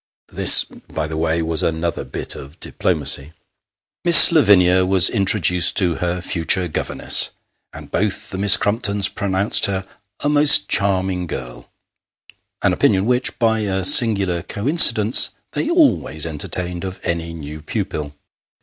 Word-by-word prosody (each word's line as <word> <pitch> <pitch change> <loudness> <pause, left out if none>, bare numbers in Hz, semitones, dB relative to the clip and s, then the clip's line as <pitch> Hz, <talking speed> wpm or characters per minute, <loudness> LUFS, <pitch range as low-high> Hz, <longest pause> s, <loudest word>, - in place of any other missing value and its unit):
This, - - +6
by - - -9
the 80 0 -8
way, 80 +1 -3
was 80 -1 -3
another 80 0 -4
bit - - -6
oi 70 - -12
diplomacy. 75 -3 -2 0.7
Miss 170 -1 +8
Lavinia 95 - +2
was 95 -1 +2
introduced 95 -4 +1
to 90 -4 0
her 90 0 -5
future 90 +1 0
governess, 75 - 0 0.4
and - - -14
both 105 -1 -3
the 95 - -7
Miss 100 0 +6
Crumptons 100 -2 -1
pronounced 100 0 -1
her 95 -1 -5 0.2
" 100 - -57
a - - -1
most 145 -9 +3
charming 95 -2 -2
girl; 60 -5 -10 0.5
" - - -33
an - - 0
opinion 95 +1 -1
which, 125 +2 -1
by 110 -1 -1
a 95 -3 -4
singular 100 -6 +4
coincidence, 115 - +2 0.2
they 310 - -5
always 295 - 0
entertained 85 +3 -4
of 95 -1 -8
any 85 -1 -5
new 75 -1 -11
pupil. 75 -1 -7
95 Hz, 140 wpm, -17 LUFS, 85-105 Hz, 0.7 s, Miss